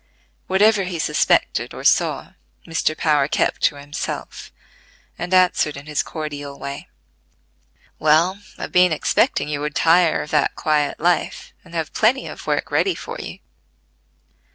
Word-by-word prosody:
Whatever 200 +1 +3
he 180 -2 -4
suspected 155 - +1
or - - -8
saw, - - +1 0.3
Mr. 165 -1 -1
Power 150 -3 +2
kept - - 0
to 150 - +2
himself, 145 +1 -6 0.7
and 175 +2 -4
answered 180 -5 +3
in 140 - -10
his 150 -1 -1
cordial 145 -3 -6
way: 140 0 -7 1.1
"Well, 160 +6 +3 0.2
I've - - -6
been 180 -1 +5
expecting 150 - +1
you 145 -1 -3
would 150 0 -4
tire 165 0 +3
of 150 - -11
that 150 -2 +1
quiet 150 -2 0
life, 175 +2 -1
and 170 -1 -13
have 160 -2 -3
plenty 245 +5 +2
of - - -9
work - - -1
ready 385 - +2
for - - -7
you. - - -7
155 Hz, 145 wpm, -21 LUFS, 150-180 Hz, 1.1 s, been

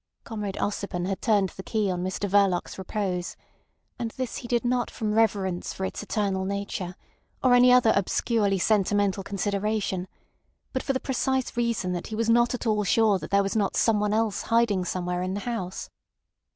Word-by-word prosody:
Comrade 210 -3 -4
Ossipon 200 -3 -2
had 190 0 -3
turned 205 -5 +2
the 190 - -9
key 210 -1 -1
on 180 -1 -2
Mr 185 +2 -2
Verloc's 195 -2 +2
repose; 190 -2 -3 0.6
and 235 - -2
this 255 -2 -3
he 240 - -7
did 240 0 0
not 245 -1 +1
from 215 -1 -2
reverence 195 -5 +1
for 190 - -3
its - - -4
eternal 200 -3 -1
nature 195 -2 -4 0.5
or 255 -1 +5
any 250 0 +7
other 250 -3 +6
obscurely 200 +1 +1
sentimental 205 0 +2
consideration, 200 -1 -2 0.7
but 260 - -1
for 270 - -1
the 260 - 0
precise 265 -1 -1
reason 235 -6 0
that 175 - -4
he 220 - -5
was 230 +1 +1
not 240 +1 +3
at 250 - -6
all 210 -2 +2
sure 210 -1 +3
that - - -7
there 200 0 +3
was 195 - -2
not 205 -3 +1
someone 210 -2 +2
else 220 -1 +1
hiding 230 -5 +2
somewhere 180 0 -2
in 185 +1 -2
the 205 - -3
house. 195 -6 -4
205 Hz, 180 wpm, -26 LUFS, 190-230 Hz, 0.7 s, any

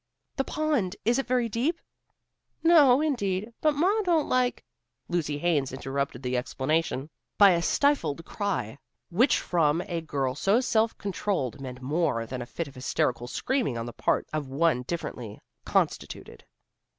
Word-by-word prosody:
"The 270 - +2
pond! 285 -12 -1
Is 240 +4 +3
it 270 - -2
very 250 -1 +1
deep?" 255 +10 -1 0.8
"No, 295 -6 +6
indeed. 215 -7 -1
But 305 -1 +3
ma 385 +9 +2
don't 340 -6 +2
like 250 -1 +1 0.2
" 120 0 -54
Lucy 155 -4 -1
Haines 145 -4 +1
interrupted 135 -1 -3
the 125 0 -1
explanation 135 +4 -1 0.3
by 200 -2 +8
a 170 -1 +2
stifled 170 - +1
cry, 145 - -3 0.3
which 240 +9 +4
from 165 -1 +1
a 170 -3 -2
girl 140 -5 -2
so 195 - +2
self 225 -3 +1
controlled 185 - -2
meant 130 -1 -8
more 145 -5 0
than 125 +2 -5
a 120 - -6
fit 165 +5 -4
of 140 - -12
hysterical 125 -2 -1
screaming 245 - -1
on 115 - -3
the 120 - -7
part - - 0
of 155 -3 -2
one 140 -1 +1
differently 120 -10 -5 0.3
constituted. - - -2
170 Hz, 155 wpm, -27 LUFS, -, 0.8 s, by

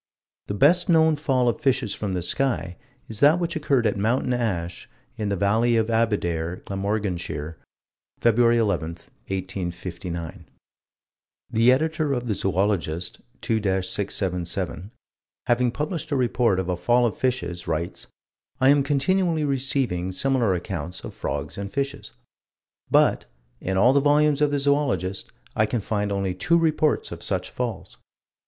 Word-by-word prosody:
The 100 - -3
best 175 - +4
known 160 -2 +5
fall 135 -4 +1
of 120 +6 0
fishes 130 -7 +1
from 100 -3 -3
the 90 - -2
sky 105 -3 -1 0.3
is 110 -2 -5
that 150 +4 +6
which 170 0 -2
occurred 145 -6 +1
at - - +1
Mountain 125 +4 +1
Ash, 90 -8 -3 0.3
in 105 -2 -2
the 100 - 0
Valley 110 +5 +2
of 110 +1 +1
Abedare, 90 -7 0
Glamorganshire, 95 -6 -3 0.6
Feb. 115 0 +3 0.2
11, 100 -8 0 0.4
1859. 90 -3 -5 1.1
The 115 +3 +5
Editor 155 +1 +1
of 125 -2 -2
the 110 - 0
Zoologist, 95 -3 -1 0.2
2 115 - 0
677, 95 -1 -2 0.6
having 120 +1 +2
published 155 +7 -3
a 145 - 0
report 120 -6 +2
of 95 - -2
a 90 - 0
fall 120 +8 +2
of 115 - -1
fishes, 125 -9 -2
writes: 85 +1 -3 0.5
"I 130 0 +5
am 145 0 +5
continually 155 +4 +1
receiving 130 -10 0
similar 120 -1 +1
accounts 90 0 -5
of - - -7
frogs - - -4
and 100 0 -5
fishes." 140 0 -3 0.8
But, - - +3 0.3
in 95 0 -2
all 120 +7 +5
the 140 - +5
volumes 145 0 +3
of 150 - +4
the 145 0 0
Zoologist, 135 - 0 0.2
I 110 - +3
can 120 - -1
find 105 -1 -2
only 100 -2 -1
two 170 - +2
reports 155 -2 +1
of - - -7
such - - -2
falls. 120 -5 -5
110 Hz, 145 wpm, -24 LUFS, 95-135 Hz, 1.1 s, that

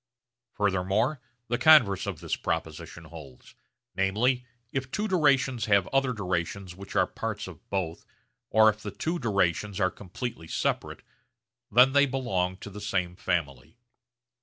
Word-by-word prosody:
Furthermore 105 +7 0 0.3
the 120 +1 -1
converse 120 -10 +6
of 95 -6 -4
this - - -1
proposition - - -4
holds; 65 - -13 0.4
namely, 120 +7 +1 0.2
if 135 -1 -3
two 210 +9 -2
durations 140 - +2
have 100 -3 +4
other 135 -1 +2
durations 95 -3 -3
which 100 +1 -10
are - - +4
parts - - -5
of - - -13
both 90 -4 -3 0.5
or 110 0 +6
if 110 0 +2
the 105 - -5
two 165 - -3
durations 100 - 0
are 95 -2 +2
completely 100 -1 -7
separate, - - -2 0.7
then 125 +5 +7
they 140 0 +5
belong 95 -9 -1
to 100 - -9
the 105 +2 -8
same 90 -4 -1
family. 80 - -3
105 Hz, 140 wpm, -28 LUFS, 95-125 Hz, 0.7 s, then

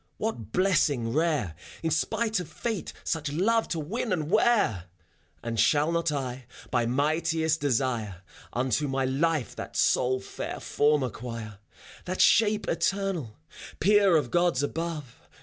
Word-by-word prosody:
What 115 - -4
blessing 145 -10 +2
rare. 150 - +1 0.3
In 165 - 0
spite 220 +7 0
of 180 - -6
Fate 225 -6 -4
such 155 -3 -2
love 225 +9 +2
to 165 - -2
win 215 +9 -3
and 160 -3 -1
wear! 210 - +3 0.6
And 115 -1 -3
shall 145 +8 +3
not 170 -1 0
I, 130 -3 -4 0.2
by 120 -2 +1
mightiest 160 +4 +1
desire, 115 -8 -1 0.3
Unto 130 +4 0
my 135 0 0
life 145 0 0
that - - -7
sole 130 +1 +2
fair - - -6
form 145 -1 +2
acquire. 115 -3 -6 0.5
That 185 +1 -4
shape 215 -1 +4
eternal, 190 - -1 0.4
peer 200 -1 +5
of 135 -6 -2
Gods 175 -6 +2
above. 155 -4 -4
150 Hz, 135 wpm, -27 LUFS, 125-175 Hz, 0.6 s, peer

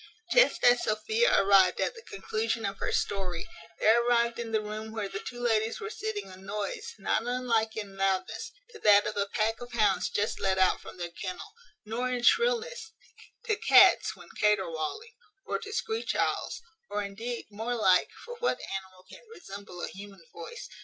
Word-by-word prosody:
Just - - +4
as 245 0 +6
Sophia 440 - +2
arrived 195 -2 +5
at - - 0
the 460 - -12
conclusion 225 - -3
of 195 0 -4
her - - -1
story, 185 -4 -2 0.3
there 230 +2 +5
arrived 235 -1 +2
in 230 -1 -4
the 220 - +2
room 215 +1 -6
where 220 -2 -3
the 195 - -5
two 245 +3 -8
ladies 225 -2 +1
were 440 0 -5
sitting 435 -1 -4
a 185 - -11
noise, 200 +1 -5
not 205 - 0
unlike, 230 -3 0
in 200 -2 -6
loudness, 190 -1 -1 0.2
to 440 - -12
that 205 - +6
of 215 - -3
a 200 0 0
pack 225 +2 -1
of 245 0 -9
hounds 215 -3 +2
just 205 +1 -1
let 190 -1 +1
out 185 -1 +3
from - - -11
their 175 -1 -5
kennel; 190 - -7 0.3
nor, 235 +4 -2
in 250 -1 -2
shrillness, 470 - +2 0.5
to 435 -3 +1
cats, 420 - +6
when - - -15
caterwauling; 205 - 0 0.3
or - - -2
to 425 -2 -8
screech 445 +1 -2
owls; - - -1 0.3
or, 205 0 -2
indeed, 225 +5 -5
more 225 +4 -3
like 185 -5 +4 0.2
(for 485 0 -8
what 475 - 0 0.2
animal 185 -1 -13
can - - -13
resemble 200 - -9
a - - -1
human 195 +3 -11
voice?) 475 +2 -8
220 Hz, 180 wpm, -29 LUFS, 195-250 Hz, 0.5 s, as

